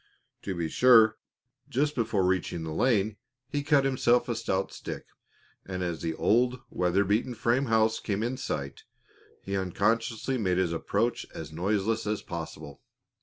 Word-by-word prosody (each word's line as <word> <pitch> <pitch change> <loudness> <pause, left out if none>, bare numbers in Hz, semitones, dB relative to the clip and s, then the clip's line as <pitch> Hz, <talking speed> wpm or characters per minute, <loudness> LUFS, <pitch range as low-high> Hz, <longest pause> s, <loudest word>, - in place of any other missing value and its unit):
To 95 - -4
be 85 -2 -1
sure, 110 +2 +5 0.5
just 145 +4 +1
before 110 -6 0
reaching 90 -2 0
the 80 -1 -4
lane 105 0 +1 0.3
he 145 - 0
cut 145 -2 +3
himself 125 -2 +2
a 120 - -1
stout 95 -4 -1
stick, - - -7 0.6
and 95 -1 -4
as 85 -3 -3
the 80 -2 -2
old, 125 +6 +2
weather 90 +2 +2
beaten 110 +5 0
frame 120 +4 +1
house 110 0 +2
came 105 0 -2
in 125 +3 -2
sight 70 - -4 0.6
he 100 - -3
unconsciously 115 +6 0
made 90 -4 +1
his 90 -3 +1
approach 80 - -1
as 80 -2 -7
noiseless 105 +5 0
as 105 0 -2
possible. 80 -4 -7
105 Hz, 155 wpm, -28 LUFS, 90-120 Hz, 0.6 s, sure